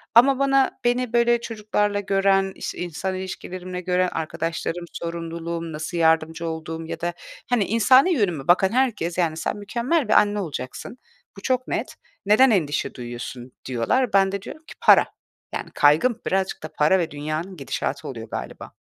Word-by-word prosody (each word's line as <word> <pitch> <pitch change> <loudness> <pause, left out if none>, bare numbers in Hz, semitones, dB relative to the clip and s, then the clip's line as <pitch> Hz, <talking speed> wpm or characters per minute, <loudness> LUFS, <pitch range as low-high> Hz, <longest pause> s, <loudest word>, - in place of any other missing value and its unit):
ama 265 +3 +6
bana 275 -1 +2
beni 245 0 0
böyle 235 0 +3
çocuklarla 210 -2 -1
gören, 195 -1 +2
işte, - - -6
insan 180 +2 -3
ilişkilerimle 185 -1 -6
gören 180 0 +1
arkadaşlarım, 165 +2 -3
sorumluluğum, 170 0 -5
nasıl 155 +3 -4
yardımcı 160 0 +2
olduğum 160 0 -5
ya - - -6
da 175 0 -1 0.4
hani, 235 -5 +2
insani 255 - +5
yönüme 175 - -1
bakan 185 +2 +5
herkes, 230 -10 0
yani 165 -3 +1
“Sen - - -2
mükemmel 235 +8 -1
bir - - +2
anne 210 0 +4
olacaksın, 150 - -6 0.4
bu - - -9
çok 255 +3 0
net. - - -3 0.3
Neden 230 +6 +6
endişe 155 -7 0
duyuyorsun?” 120 0 -7
diyorlar. 160 - 0
Ben 195 -1 +4
de 200 - -3
diyorum 310 +10 -10
ki - - -10
“Para.” - - +7 0.5
Yani, - - -5
kaygım 165 +12 +3
birazcık 190 -2 -1
da - - -4
para 155 +6 +3
ve 165 - -2
dünyanın 155 +5 -4
gidişatı 140 - -3
oluyor 115 -4 -7
galiba. - - -7
185 Hz, 160 wpm, -23 LUFS, 160-220 Hz, 0.5 s, Para